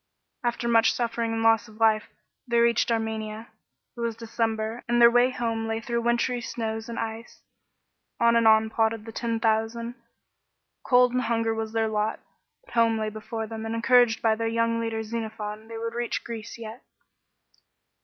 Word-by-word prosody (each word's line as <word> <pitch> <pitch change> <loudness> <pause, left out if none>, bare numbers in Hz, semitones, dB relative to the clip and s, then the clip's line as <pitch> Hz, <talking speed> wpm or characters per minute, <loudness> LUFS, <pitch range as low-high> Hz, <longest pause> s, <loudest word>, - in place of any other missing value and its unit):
After 240 0 -1
much 225 -1 +4
suffering 235 -1 -1
and 225 0 -1
loss 225 +1 +4
of 215 - -15
life, 220 -1 +3 0.4
they 235 -1 +1
reached 235 0 +3
Armenia. 220 -1 -3 0.5
It - - -12
was 235 -1 -2
December, 225 0 -2
and 240 0 +3
their 235 0 +8
way 245 +1 +4
home 230 -3 -2
lay 225 0 -1
through 235 +1 -2
wintry 235 +1 0
snows 225 -1 -4
and 230 - -5
ice. 225 +1 -6 0.8
On 235 0 +4
and 230 -1 +4
on 220 0 +5
plodded 225 -1 0
the 225 - -7
Ten 230 0 -2
Thousand; 225 +1 0 0.9
cold 250 -1 +4
and 255 - +1
hunger 230 -2 0
was 220 0 -4
their 225 -1 +1
lot, 215 0 -1 0.5
but - - -16
home 230 -1 +3
lay 215 0 -1
before 220 +1 -5
them, 220 0 -7
and 225 +1 -3
encouraged 235 0 +4
by 225 -1 +4
their 225 +1 -2
young 230 0 +1
leader 225 -1 -2
Xenophon, 220 -1 -5
they 225 0 -7
would 230 0 -4
reach 240 0 -2
Greece 230 -1 -7
yet. 230 +1 -9
225 Hz, 175 wpm, -26 LUFS, 220-235 Hz, 0.9 s, their